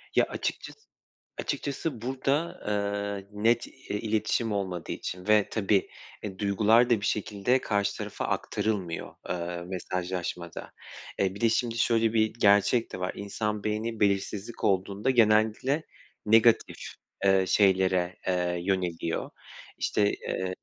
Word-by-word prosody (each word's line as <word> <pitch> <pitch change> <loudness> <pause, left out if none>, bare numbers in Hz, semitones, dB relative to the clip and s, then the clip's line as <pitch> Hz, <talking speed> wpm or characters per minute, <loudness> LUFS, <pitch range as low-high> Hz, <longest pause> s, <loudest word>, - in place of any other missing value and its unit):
Ya - - +5
açıkçası - - -4 0.6
açıkçası 140 -3 -3
burada, 135 +6 -1
ııı, 100 -1 -2
net 115 +3 +2
i - - -15 0.2
iletişim 110 +1 0
olmadığı 95 -4 -3
için 90 +2 -5
ve, 105 -1 +5
tabii, 100 -2 +1 0.3
e, 95 -2 -6
duygular 110 +4 +4
da 110 -4 +3
bir - - -2
şekilde 105 +5 0
karşı 100 -1 0
tarafa - - -4
aktarılmıyor, 95 -6 -2
ııı, 85 0 -3
mesajlaşmada. 90 -1 -4 0.5
E, 95 0 +1
bir 100 - -9
de 115 - +4
şimdi 115 0 0
şöyle 115 -1 +2
bir 110 -1 +2
gerçek 105 +2 +3
de - - -5
var: 90 - -1
İnsan 105 +1 -3
beyni 110 +1 -2
belirsizlik 100 +2 -1
olduğunda 100 +3 +1
genellikle 115 +5 +3 0.4
negatif, 115 +1 +4 0.5
ııı, 95 -1 +4
şeylere, 95 -3 +3
eee, 90 -1 0
yöneliyor, 90 -3 -1 0.5
işte, 100 -1 +1
ııı 95 0 -2
105 Hz, 125 wpm, -28 LUFS, 95-115 Hz, 0.6 s, Ya